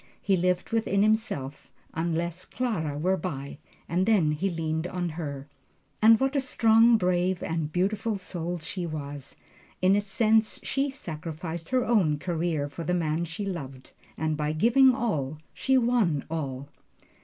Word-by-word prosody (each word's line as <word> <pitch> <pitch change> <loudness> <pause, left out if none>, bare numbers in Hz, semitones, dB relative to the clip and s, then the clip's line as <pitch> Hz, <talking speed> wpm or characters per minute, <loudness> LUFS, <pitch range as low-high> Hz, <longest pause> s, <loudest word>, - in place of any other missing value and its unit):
He 195 - +2
lived 180 +2 0
within 210 -3 +2
himself, 210 - -1 0.2
unless 170 +2 -2
Clara 165 - -2
were 185 +5 +1
by, 140 -6 -5 0.3
and 180 +3 0
then 190 -9 +4
he 180 +6 -1
leaned 160 -1 -2
on 180 -1 -3
her. 145 -4 -6 0.5
And 220 +1 +7
what 270 +2 0
a - - +4
strong, 230 -3 +5
brave 180 -1 0
and 160 -2 -2
beautiful 200 +5 0
soul 175 -2 -4
she 175 +2 -5
was! 145 -3 -6 0.4
In 185 +2 +4
a 205 - +2
sense 215 +2 +2
she 275 +1 0
sacrificed 165 - -6
her 255 -1 +1
own 190 -11 +3
career 165 -2 -1
for 155 +4 -7
the 180 +3 0
man 165 0 0
she 165 +5 -5
loved. 135 -9 -6 0.2
And 155 -1 0
by 150 0 -1
giving 245 +9 +5
all, 155 - -2 0.2
she 265 0 +2
won 230 - +2
all. 140 -4 -4
175 Hz, 155 wpm, -27 LUFS, 155-215 Hz, 0.5 s, And